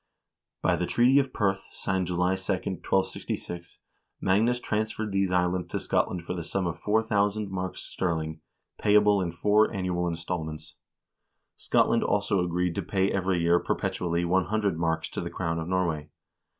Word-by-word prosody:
By 90 - +3
the 90 +1 -1
treaty 125 +4 +5
of 135 -2 0
Perth, 95 -4 0
signed 95 -2 -1
July 90 +1 +1
2, 95 +1 -1
1266, 90 -2 -3 0.4
Magnus 110 +6 +2
transferred 110 -1 -2
these 95 -1 +1
islands 90 0 +1
to - - -3
Scotland 85 -2 0
for - - -3
the 85 -2 -4
sum 95 +3 -2
of 85 -1 -3
4000 105 -1 +1
marks 95 -1 -4
sterling, 80 -3 -3 0.4
payable 105 -1 +4
in 85 -2 -1
four 105 +5 +3
annual 90 -2 -1
installments. 80 -2 -4 0.8
Scotland 115 - +2
also 100 -2 +1
agreed 90 0 0
to - - -2
pay 95 0 0
every 95 -2 0
year 85 +1 +4
perpetually 85 -1 -1
100 95 +2 +1
marks 80 -1 0
to - - -3
the - - -4
crown 85 0 -2
of 80 - -4
Norway. 85 -5 -1
90 Hz, 150 wpm, -27 LUFS, 85-100 Hz, 0.8 s, treaty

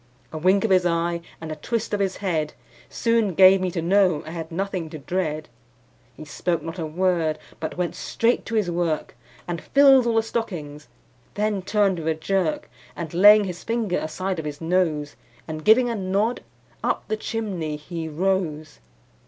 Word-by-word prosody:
A - - -4
wink 190 +4 +3
of 220 - 0
his 185 -1 +5
eye, 170 0 0 0.2
and 160 -1 -7
a - - -3
twist 220 +8 -3
of 205 - +1
his 195 -2 -1
head, 155 -5 -1 0.4
Soon 230 -6 +1
gave 190 +1 +7
me 185 - 0
to 170 -2 -3
know 180 -3 +3
I 160 - -7
had 165 -1 -6
nothing 185 -2 -3
to 155 - -7
dread. 155 0 -3 0.7
He 155 - -9
spoke 170 +3 -2
not 165 +2 -6
a 160 - -2
word, 165 -2 0 0.2
but 160 +3 -5
went 180 -1 -1
straight 235 +1 0
to 230 - -3
his 205 -5 +1
work, 170 -3 -2 0.3
And 170 -2 -3
filled 270 -3 +5
all 230 - +1
the 225 - +3
stockings; 155 - -5 0.5
then 210 -1 0
turned 200 -1 +1
with 160 - -5
a 160 - +1
jerk, 170 0 -1 0.3
And 165 -2 -6
laying 205 +4 +7
his 180 -3 -6
finger 225 -5 -1
aside 185 +3 -3
of 160 - -5
his 145 -1 -5
nose, 160 -4 0 0.3
And 155 -1 -6
giving 245 +6 +5
a 235 - -1
nod, 200 +4 0 0.4
up - - -1
the 215 - 0
chimney 200 -9 -3
he 160 +2 -6
rose. 160 - -2
180 Hz, 185 wpm, -24 LUFS, 160-200 Hz, 0.7 s, gave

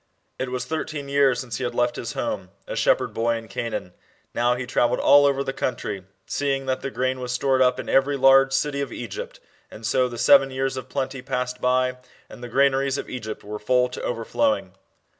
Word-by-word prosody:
It 130 - -2
was 125 0 -3
thirteen 150 -1 -4
years 140 -3 +3
since 120 -4 -5
he 130 - -4
had 120 -1 -3
left 120 0 +1
his - - -5
home, - - -3 0.2
a - - -5
shepherd - - +2
boy 115 +1 +1
in 115 -1 -7
Canaan. 105 -3 -4 0.4
Now 120 +1 +2
he 125 0 -4
travelled 120 0 +1
all 145 0 +6
over 140 0 +1
the 135 -1 -3
country, 105 -7 -3 0.2
seeing 135 -1 -1
that 130 0 -1
the 135 - -3
grain 130 0 -1
was 125 -1 -4
stored 130 +1 +2
up 125 -1 +3
in - - -6
every 140 +1 +2
large 135 0 +6
city 140 +1 0
of 140 - -4
Egypt. 115 -5 -7 0.3
And 110 - -10
so 125 +2 +2
the 120 - -7
seven 135 +3 +6
years 135 0 -2
of 130 - -7
plenty 135 -1 -3
passed 125 -1 -3
by 130 0 +1 0.3
and 120 - -12
the 120 - -6
gran 135 +3 +4
aries 135 0 0
of - - -6
Egypt 110 -4 -6
were 105 +1 -6
full 125 +3 +2
to 125 - -7
overflowing. 125 - -1
130 Hz, 215 wpm, -24 LUFS, 120-135 Hz, 0.4 s, all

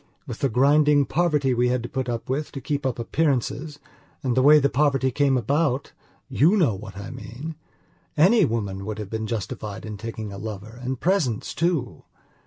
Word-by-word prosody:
With 120 -3 -7
the 135 - +1
grinding 145 +4 +4
poverty 150 -6 +1
we 125 0 +2
had 125 -1 0
to - - -4
put 130 -2 -3
up 115 +1 -3
with 140 +4 -2
to 135 - -5
keep 140 +1 -2
up 125 - -2
appearances, 140 +3 -1 0.5
and 125 -3 0
the 130 - +4
way 150 +3 +8
the 140 -2 +3
poverty 135 -2 +1
came 140 0 +2
aboutyou 140 - 0
know 155 - +3
what 100 0 -9
I 100 +3 -7
meanany 160 - -1
woman 100 -4 -3
would 105 0 -4
have 105 -2 -7
been 110 -1 -3
justified 105 -1 -5
in 105 -1 -6
taking 110 -1 -6
a 100 - -7
lover 110 +2 -7
and 130 0 -3
presents 160 - 0
too. 155 - -1
130 Hz, 180 wpm, -24 LUFS, 110-145 Hz, 0.5 s, way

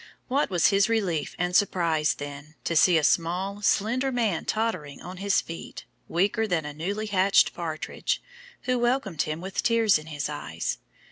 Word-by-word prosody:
What 275 +3 +1
was 175 -4 +3
his 200 +2 +3
relief 190 -9 0
and 180 0 -1
surprise, 165 -6 +2
then, 145 +1 -8
to 170 - -1
see 170 +2 +6
a 155 - +1
"small, 180 +6 +1
slender 245 +7 +1
man, 225 -9 0
tottering 185 -11 -2
on 180 +1 -9
his 200 +1 +2
feet, 165 - -8 0.2
weaker 205 +6 +1
than 170 -6 0
a 150 - -5
newly 200 +8 -3
hatched 195 -1 +3
partridge," 160 -3 -3 0.4
who 255 0 0
welcomed 240 - 0
him 155 +2 -3
with 190 +1 -3
tears 225 -6 +3
in 155 - -12
his 145 -2 -3
eyes. 85 - -4
185 Hz, 165 wpm, -26 LUFS, 160-215 Hz, 0.4 s, see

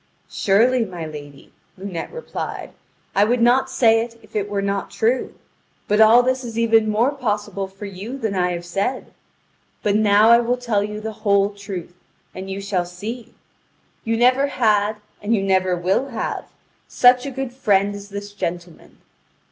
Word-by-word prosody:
"Surely, 235 +5 +3
my 180 -6 -6
lady," 145 -2 -11 0.2
Lunete 185 -3 -6
replied, 485 +1 -6 0.4
"I 200 - +5
would 240 +4 +2
not 245 +3 +3
say 225 -2 +4
it 230 0 -7
if 215 0 -19
it 205 -1 -1
were 200 -1 -2
not 200 0 -2
true. 240 +3 -1 0.5
But 210 +1 +3
all 225 +3 +7
this 260 +1 0
is 230 -2 -7
even 225 -1 +3
more 230 +6 +2
possible 205 -7 -3
for 195 +2 -10
you 200 +7 -7
than 220 -6 -2
I 180 -1 0
have 175 0 -6
said: 195 +9 -3 0.7
but 205 -1 +1
now 215 +1 +5
I 235 - +7
will 240 +1 0
tell 230 -5 0
you 210 0 -5
the 220 +1 -4
whole 200 -1 +3
truth, 195 -4 -7 0.4
and 190 +1 -7
you 195 +1 -4
shall 195 -2 -1
see: 220 +7 -8 0.7
you 225 -1 -1
never 255 +4 +4
had 215 -5 +1 0.3
and 220 +3 +1
you 195 - -1
never 185 -1 +2
will 185 +9 0
have 240 -5 -4 0.4
such 250 +2 +4
a - - -2
good 265 -2 -5
friend 205 -5 +2
as 200 0 -9
this 205 0 -7
gentleman. 175 -3 -6
210 Hz, 170 wpm, -21 LUFS, 195-235 Hz, 0.7 s, all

